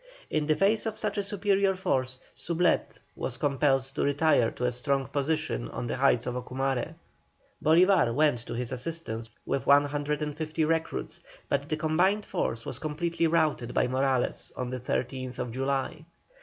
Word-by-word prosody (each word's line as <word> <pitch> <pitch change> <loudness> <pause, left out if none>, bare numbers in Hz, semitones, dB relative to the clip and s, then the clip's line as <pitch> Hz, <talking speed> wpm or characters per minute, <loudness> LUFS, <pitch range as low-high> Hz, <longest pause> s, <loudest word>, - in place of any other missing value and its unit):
In 150 -1 0
the 155 - +3
face 210 +5 +2
of 220 -1 -3
such 210 -1 -1
a - - 0
superior 200 -1 +1
force, 130 -8 -1 0.2
Soublette 170 +1 0 0.2
was - - -3
compelled 135 -1 +2
to - - -2
retire 145 -4 +3
to 125 - -4
a 125 - +2
strong 135 +3 0
position 140 - -1
on - - -4
the 120 - -2
heights 130 -3 +3
of 125 - -2
Ocumare. 130 +1 -2 0.7
Bolívar 175 -3 +5
went 150 -4 +3
to - - -4
his 120 0 -3
assistance 125 -4 -4 0.2
with 140 - -2
150 150 +2 +1
recruits, 160 +1 -1 0.3
but 140 0 0
the 155 - 0
combined 180 +7 +2
force 120 -10 -2
was - - -5
completely 165 +2 0
routed 155 -7 +1
by - - +3
Morales 130 0 0
on 125 -1 -3
the 130 - -3
13th 125 0 -3
July. 135 +4 -2
145 Hz, 155 wpm, -28 LUFS, 130-165 Hz, 0.7 s, Bolívar